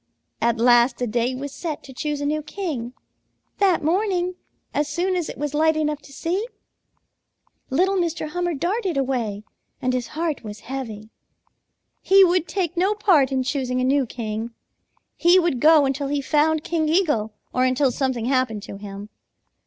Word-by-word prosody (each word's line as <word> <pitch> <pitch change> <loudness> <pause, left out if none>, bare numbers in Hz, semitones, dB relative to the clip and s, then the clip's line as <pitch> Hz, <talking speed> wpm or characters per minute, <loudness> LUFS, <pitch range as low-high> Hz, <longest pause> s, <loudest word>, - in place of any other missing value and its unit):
At 235 -1 +2
last 240 +1 +4
a 250 - 0
day 240 +2 0
was 280 +2 -6
set 315 -4 -5
to 265 - -11
choose 295 +2 -3
a - - -1
new 305 +1 0
king. 300 -7 -5 0.7
That 375 -5 +3
morning, 365 +1 +1 0.4
as 295 0 0
soon 350 +5 -1
as 350 -3 -2
it - - -7
was 295 -1 -3
light 315 +1 +3
enough 300 -1 -1
to - - -16
see, 360 - -2 1.2
little 370 +8 +2
Mr. 335 -3 -1
Hummer 350 0 -1
darted 370 - -1
away, 240 -7 -1 0.4
and 255 0 0
his 250 -1 -1
heart 325 -4 -1
was 210 -1 -8
heavy. 225 -5 -6 0.9
He 390 0 +6
would 355 -2 +2
take 350 0 -2
no 380 +4 +2
part 340 -11 +3
in 260 -1 +1
choosing 255 -1 -1
a - - +1
new 270 0 +2
king. 220 -1 -4 0.7
He 345 +2 +5
would 340 -8 +2
go 305 +1 +6
until 275 +1 -1
he 285 +1 0
found 300 +2 +2
King 315 -2 0
Eagle 295 - +1 0.2
or 255 - +2
until 255 +1 +2
something 255 -3 -1
happened 250 -5 0
to 200 - -8
him. 200 0 -8
290 Hz, 170 wpm, -23 LUFS, 250-340 Hz, 1.2 s, He